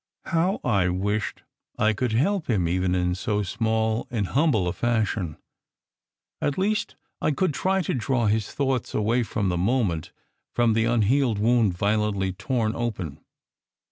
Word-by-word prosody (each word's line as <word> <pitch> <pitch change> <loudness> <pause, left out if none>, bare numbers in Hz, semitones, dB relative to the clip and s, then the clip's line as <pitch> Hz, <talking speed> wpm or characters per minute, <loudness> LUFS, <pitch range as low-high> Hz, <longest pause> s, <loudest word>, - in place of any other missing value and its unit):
How 175 +5 +1
I 100 -7 +2
wished 105 +4 -2 0.3
I 110 +1 +3
could 115 +2 -1
help 185 - +1
him 95 -7 +2
even 90 +1 +1
in 90 -1 +1
so 105 +3 -1
small 110 +2 0
and 110 -4 -1
hum 155 - +3
ble 105 -10 +1
a 85 - -1
fashion! 110 -8 -1 1.0
At 145 - 0
least, 210 +3 0 0.3
I - - +2
could 155 +2 +1
try 190 +5 +1
to - - -1
draw 125 -1 0
his 105 0 +1
thoughts 135 -4 -1
away 115 +4 +2
for 110 -2 -2
the 90 -3 +1
moment 100 -5 0 0.4
from 120 -2 +3
the 115 +1 +2
unhealed 120 +1 +2
wound 110 -4 +2
violently 100 -2 0
torn 110 +1 -1
open. 100 -11 -3
110 Hz, 155 wpm, -25 LUFS, 100-125 Hz, 1.0 s, I